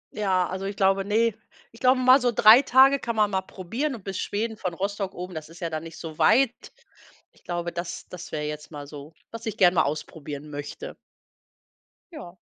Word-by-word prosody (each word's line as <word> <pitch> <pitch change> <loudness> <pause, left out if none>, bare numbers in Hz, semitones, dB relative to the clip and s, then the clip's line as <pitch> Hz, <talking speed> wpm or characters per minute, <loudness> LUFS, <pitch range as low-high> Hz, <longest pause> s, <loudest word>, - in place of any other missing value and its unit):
Ja, 190 -4 +1
also 190 +1 -5
ich 200 0 -4
glaube 195 0 +2
ne, 225 +2 +2 0.4
ich 230 - -17
glaube, 255 0 +4
mal 255 +1 +6
so 245 -1 +2
3 220 +3 +8
Tage 270 +1 +5
kann 235 -1 -4
man 210 -1 +2
mal 190 0 0
probieren 230 - -4
und 205 - -12
bis 195 -2 -5
Schweden 220 +2 -3
von 180 -4 -4
Rostock 195 0 -3
oben, 180 +1 -7
das 155 0 -7
ist 170 - -14
ja 170 -2 -4
dann 155 0 -3
nicht 165 0 -10
so 160 -2 -9
weit. 245 +2 +4 0.8
Ich - - -27
glaube, 175 -1 -3
das 170 0 -6
das 180 -1 -9
wäre 150 -1 -3
jetzt 150 0 -6
mal 145 -2 -8
so, 145 +2 -11 0.2
was 230 0 -8
ich 215 0 -4
gerne 180 -1 +5
mal - - +4
ausprobieren 150 0 -6
möchte. 145 - -7 1.2
Ja. 185 - -10
190 Hz, 205 wpm, -25 LUFS, 165-225 Hz, 1.2 s, 3